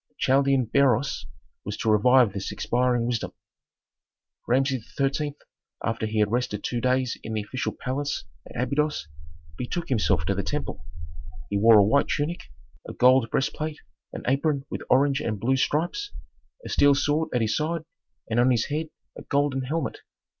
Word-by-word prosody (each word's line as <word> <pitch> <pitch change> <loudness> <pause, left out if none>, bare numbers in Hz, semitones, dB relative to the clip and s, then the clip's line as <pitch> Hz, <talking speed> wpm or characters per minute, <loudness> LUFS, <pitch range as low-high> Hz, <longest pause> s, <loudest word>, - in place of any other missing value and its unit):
The - - -41
Chaldean 135 -1 +3
Beroes 135 +2 +1 0.4
was - - -5
to 110 - +1
revive 120 +1 +5
this 100 -1 -4
expiring 125 -1 0
wisdom. 120 -2 -2 1.1
Rameses 130 -1 0
XIII., 145 +1 0 0.5
after 110 -1 -1
he 110 0 -3
had 105 -1 +2
rested 115 -4 -1
two 120 -1 -2
days 130 0 0
in 110 - -6
the 110 -1 -1
official 130 +5 -3
palace 140 +1 -2 0.3
at - - -7
Abydos, 145 - 0 0.5
betook 165 +7 -3
himself 100 - +1
to 100 - +1
the 95 - -1
temple. - - -4 0.6
He 100 - +1
wore 115 +1 +7
a 100 - +7
white 140 +7 +3
tunic, 155 +4 -2 0.4
a - - -6
gold 125 -2 +4
breastplate, 150 +4 -2 0.3
an - - -7
apron 140 +1 +1
with - - -4
orange 135 +1 +3
and 110 -3 -2
blue 130 +5 +2
stripes, 170 - -1 0.6
a - - -6
steel 145 0 +4
sword 150 +3 +1
at 125 - 0
his 110 -1 +1
side 160 +1 -1 0.4
and 115 +1 0
on 125 +1 +5
his 120 -3 +1
head 155 +2 -2 0.3
a - - -9
golden 140 -1 0
helmet. 155 +3 -3
130 Hz, 165 wpm, -25 LUFS, 115-145 Hz, 1.1 s, wore